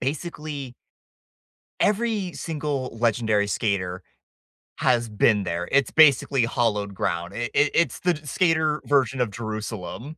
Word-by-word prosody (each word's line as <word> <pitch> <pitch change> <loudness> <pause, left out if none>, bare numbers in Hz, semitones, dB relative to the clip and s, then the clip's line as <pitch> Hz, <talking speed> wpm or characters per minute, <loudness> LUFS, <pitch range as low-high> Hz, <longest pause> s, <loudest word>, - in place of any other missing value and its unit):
Basically 145 -1 -5 1.1
every 210 -3 0
single 145 -7 -4
legendary 110 -3 +1
skater 95 -3 -2 0.8
has 120 -2 +1
been 105 0 +2
there, 85 -1 -3
it's 140 -2 +2
basically 140 -4 +5
hollowed 110 -5 -1
ground. 85 -1 -2
I 120 +3 -2
i 145 +1 +3
it's 165 -8 +1
the 180 -1 +2
d 155 -1 -10
skater 160 -4 +1
version 135 -2 +2
of 120 -4 0
Jerusalem. 110 - -6
125 Hz, 125 wpm, -24 LUFS, 105-150 Hz, 1.1 s, basically